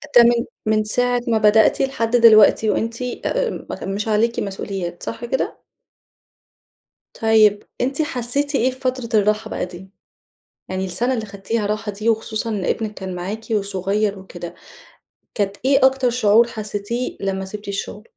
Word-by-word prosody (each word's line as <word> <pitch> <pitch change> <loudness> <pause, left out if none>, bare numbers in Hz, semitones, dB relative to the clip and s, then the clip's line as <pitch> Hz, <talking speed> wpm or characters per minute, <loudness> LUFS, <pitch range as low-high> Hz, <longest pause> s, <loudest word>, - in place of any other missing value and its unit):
ده 240 - +9
من 235 0 +3 0.2
من 215 0 +2
ساعة 245 +3 +1
ما 230 -2 +2
بدأتِ 215 0 +4
لحد 245 -4 0
دلوقتي 220 -2 +6
وأنتِ 230 +3 -1 0.2
آآ - - 0
م 195 - -7
مش 210 +2 -3
عليكِ 225 +2 +1
مسؤوليات، 190 -3 -5
صح 230 +1 -5
كده؟ 265 +2 -3 1.6
طيب 215 -2 +4 0.2
أنتِ 270 +4 0
حسيتِ 280 +1 +2
إيه 260 0 +2
في 255 - -9
فترة 255 -2 -2
الراحة 215 +1 0
بقى - - -3
دي؟ 180 +1 -12 0.8
يعني 185 0 -2
السنة 230 +8 0
اللي 225 -3 -3
خدتيها 205 +2 -3
راحة 210 +1 -2
دي 215 +3 -2
وخصوصًا 220 0 -1 0.2
ابنِك 220 -2 -2
كان 190 -2 -6
معاكِ 195 +5 -5
وصغير 200 0 -1
وكده، 175 -2 -9 0.8
كانت 200 -1 -1
إيه 270 0 +4
أكتر 265 -1 +3
شعور 235 -1 +4
حسيتيه 215 +2 -4
لمّا 190 -1 -2
سِبتِ 205 +2 -8
الشغل؟ 200 +1 -5
215 Hz, 150 wpm, -20 LUFS, 200-240 Hz, 1.6 s, ده